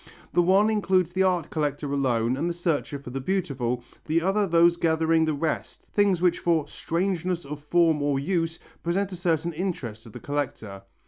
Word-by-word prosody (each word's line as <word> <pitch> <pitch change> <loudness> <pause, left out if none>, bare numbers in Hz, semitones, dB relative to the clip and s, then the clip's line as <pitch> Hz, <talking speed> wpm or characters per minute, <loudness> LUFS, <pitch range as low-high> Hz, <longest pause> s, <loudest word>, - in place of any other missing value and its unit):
The 175 - +4
one 195 +5 +4
includes 190 -5 +1
the 190 - +1
art 180 -4 +1
collector 145 -2 -2
alone 125 -3 +1
and 160 +6 -1
the 170 - -3
searcher 165 -4 -1
for 135 -3 -10
the 135 +1 -4
beautiful, 130 -8 -1 0.2
the 160 +2 +2
other 195 +4 +1
those 170 0 +5
gathering 160 -1 +2
the 155 -1 0
rest, 155 +2 -3
things 195 -4 +2
which 175 -1 +3
for 165 -4 +1
"strangeness 175 0 -2
of 150 +1 -6
form 160 -1 +3
or 145 -1 +1
use" 165 +1 -1 0.2
present 195 +3 -1
a - - -5
certain 170 -2 0
interest 150 - -4
to 115 - -13
the - - -10
collector. 120 -9 -4
165 Hz, 185 wpm, -26 LUFS, 145-180 Hz, 0.2 s, those